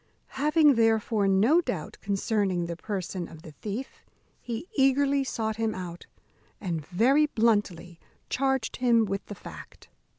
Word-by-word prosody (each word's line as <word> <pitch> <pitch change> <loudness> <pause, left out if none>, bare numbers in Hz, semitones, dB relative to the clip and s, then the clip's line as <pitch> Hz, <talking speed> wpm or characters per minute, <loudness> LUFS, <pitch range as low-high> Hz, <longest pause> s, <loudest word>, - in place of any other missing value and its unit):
Having, 300 +1 +4
therefore, 220 -2 +2
no 220 - +4
doubt 175 - -5
concerning 195 -3 0
the 170 0 -4
person 185 -2 -4
of 160 -1 -13
the 160 - -10
thief, 215 - -7 0.4
he 240 +7 -5
eagerly 275 0 +3
sought 220 -4 -3
him 225 -1 -1
out, 175 -2 -7 0.5
and 170 -6 -3
very 260 +11 +3
bluntly 205 - 0 0.3
charged 265 -2 -1
him 235 -3 +3
with 195 0 -3
the 205 - -7
fact. - - -12
220 Hz, 135 wpm, -27 LUFS, 185-265 Hz, 0.5 s, Having